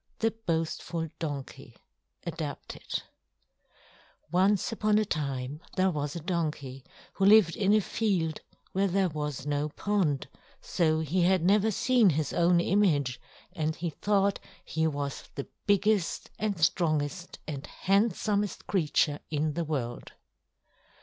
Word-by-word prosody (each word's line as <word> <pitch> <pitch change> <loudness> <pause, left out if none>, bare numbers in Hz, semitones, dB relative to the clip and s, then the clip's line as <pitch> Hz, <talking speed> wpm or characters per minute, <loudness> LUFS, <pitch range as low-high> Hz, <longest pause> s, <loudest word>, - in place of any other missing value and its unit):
THE 225 0 +1
BOASTFUL 165 -5 -2
DONKEY 145 -5 -6 0.5
(Adapted) 160 -3 -5 1.3
Once 190 +3 +3
upon 215 -1 +2
a 215 - +2
time 140 -3 -3
there 185 0 +3
was 145 -1 -3
a - - -3
donkey 150 -6 -3 0.3
who 195 - +1
lived 200 -5 +6
in 200 -1 +2
a 215 0 +5
field 180 -7 -1 0.3
where 195 +1 +2
there 190 0 +2
was 150 -3 -4
no 145 +1 0
pond; 170 -5 0 0.3
so 160 -3 +1
he 165 +4 0
had 180 0 +3
never 205 +3 +4
seen 235 0 +4
his 155 -1 -1
own 170 0 +4
image, 165 -9 +2 0.3
and 160 -3 -1
he 170 0 -3
thought 200 +3 +1 0.3
he 160 0 0
was 145 -2 -4
the 140 - -5 0.2
biggest 205 -2 +1
and 205 -4 -1
strongest 160 +1 0
and 145 -2 -5
handsomest 205 +1 0
creature 150 -4 +1
in 155 0 0
the 170 - -1
world. 130 -7 -4
170 Hz, 130 wpm, -29 LUFS, 150-200 Hz, 1.3 s, lived